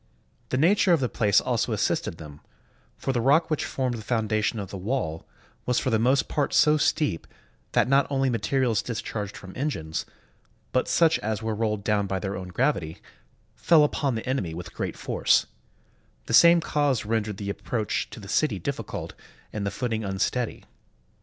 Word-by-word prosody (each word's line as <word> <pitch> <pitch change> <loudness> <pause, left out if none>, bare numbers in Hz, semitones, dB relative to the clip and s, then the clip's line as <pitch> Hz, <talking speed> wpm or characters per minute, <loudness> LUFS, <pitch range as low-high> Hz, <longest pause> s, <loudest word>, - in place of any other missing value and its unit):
The 130 - 0
nature 180 +5 +4
of 165 - +3
the 130 - 0
place 105 -4 +3
also - - -1
assisted 80 - -1
them; 75 -2 -11 0.6
for 135 - -2
the 120 - 0
rock 155 +7 +3
which 155 - 0
formed 125 -3 -2
the - - -7
foundation 110 0 0
of 100 -3 -5
the - - -6
wall 90 -7 -3 0.4
was 125 -1 +2
for 130 - 0
the 110 - +2
most 130 +4 +2
part 145 - -1
so 150 0 +5
steep 145 - 0 0.5
that 105 - +3
not 135 +2 +3
only 135 -1 +1
materials 120 -2 +1
discharged 105 -3 -5
from 95 -1 -11
engines, 105 - -3 0.6
but 130 - +1
such 165 -1 +3
as 110 0 -3
were 110 0 -1
rolled 105 -1 -1
down 100 -1 +1
by 95 - -1
their 100 0 -3
own 95 -1 -6
gravity, 90 - -1 0.6
fell 160 -3 +5
upon 140 -3 0
the 110 - -4
enemy 100 -12 -1
with 90 +1 -8
great - - -4
force; - - +2 0.8
the - - -4
same 170 +6 +7
cause 145 -8 0
rendered 105 -2 -1
the 100 0 -3
approach 110 0 -2
to - - -10
the - - -10
city - - +1
difficult - - -5 0.4
and 100 -1 -2
the - - +1
footing 110 +1 -2
unsteady. 105 +5 -2
115 Hz, 180 wpm, -26 LUFS, 100-135 Hz, 0.8 s, same